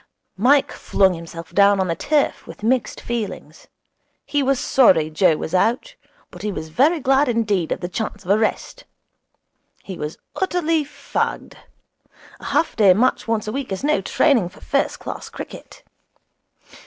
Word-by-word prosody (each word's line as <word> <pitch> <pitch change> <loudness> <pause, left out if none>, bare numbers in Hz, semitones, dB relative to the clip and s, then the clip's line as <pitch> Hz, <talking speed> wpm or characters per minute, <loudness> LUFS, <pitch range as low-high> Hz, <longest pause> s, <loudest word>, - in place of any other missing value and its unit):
Mike 270 +6 +4
flung 190 -2 +1
himself 165 0 -9
down 200 +1 +5
on 190 - +1
the 165 - -1
turf 300 - 0
with - - -12
mixed 250 +3 0
feelings. 235 -3 -6 0.6
He 290 - 0
was 270 -1 +1
sorry 180 - +4
Joe 160 0 +3
was 160 - -6
out, 240 - +1 0.4
but - - -11
he 210 - -2
was 160 -4 -6
very 295 - +2
glad 270 0 +2
indeed 210 -8 0
of - - -2
the 175 - -3
chance 210 +1 -5
of 185 - 0
a 205 - +5
rest. 220 - -2 1.0
He 190 -3 -8
was 150 +1 -5 0.2
utterly 330 -4 0
fagged. 290 - -4 0.9
A - - -12
half 330 - 0
day 200 -5 +5
match 240 +4 +1
once 220 -2 -1
a - - -2
week 270 -2 -4
is 190 - -4
no 300 +1 +2
training 235 -12 +2
for - - -18
first 80 - -1
class - - -7
cricket. - - -10
215 Hz, 165 wpm, -21 LUFS, 185-275 Hz, 1.0 s, down